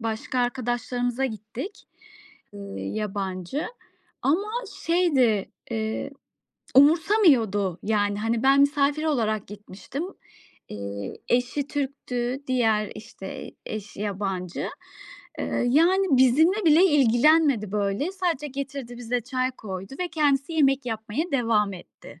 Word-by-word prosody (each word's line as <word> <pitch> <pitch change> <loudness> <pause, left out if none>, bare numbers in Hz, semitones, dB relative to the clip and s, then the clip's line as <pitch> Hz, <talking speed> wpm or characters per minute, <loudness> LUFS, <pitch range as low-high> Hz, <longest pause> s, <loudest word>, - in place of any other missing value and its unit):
başka 225 +3 -3
arkadaşlarımıza 245 0 -1
gittik, 230 - -6 0.7
eee, 205 - -10 0.2
yabancı. 190 - -3 0.6
Ama 345 +11 +1 0.3
şeydi, 275 - +2 0.2
eee, 220 +4 -2 0.7
umursamıyordu. 275 - +4
Yani, 205 -1 +1
hani, 225 +1 0
ben 275 +1 +5
misafir 285 +2 +2
olarak 220 -9 0
gitmiştim. 210 - -7 0.6
Eee, 100 -1 -6
eşi 250 +3 +1
Türk'tü 265 -2 -3
diğer, 225 -5 +1
işte, 195 -3 -8 0.2
eş 215 -1 -6
yabancı. 195 -3 -3 0.7
Eee, - - -1
yani, 355 +8 +4
bizimle 315 - +4
bile 320 +4 +7
ilgilenmedi 280 - +4
böyle. 210 - -1
Sadece 345 -6 -1
getirdi 270 -3 -6
bize 245 +1 -1
çay 255 +1 -1
koydu 195 0 -7
ve 360 - -1
kendisi 290 -1 +1
yemek 275 -3 +3
yapmaya 225 +8 -3
devam 225 -6 +2
etti. 175 -2 -14
245 Hz, 105 wpm, -25 LUFS, 210-285 Hz, 0.7 s, bile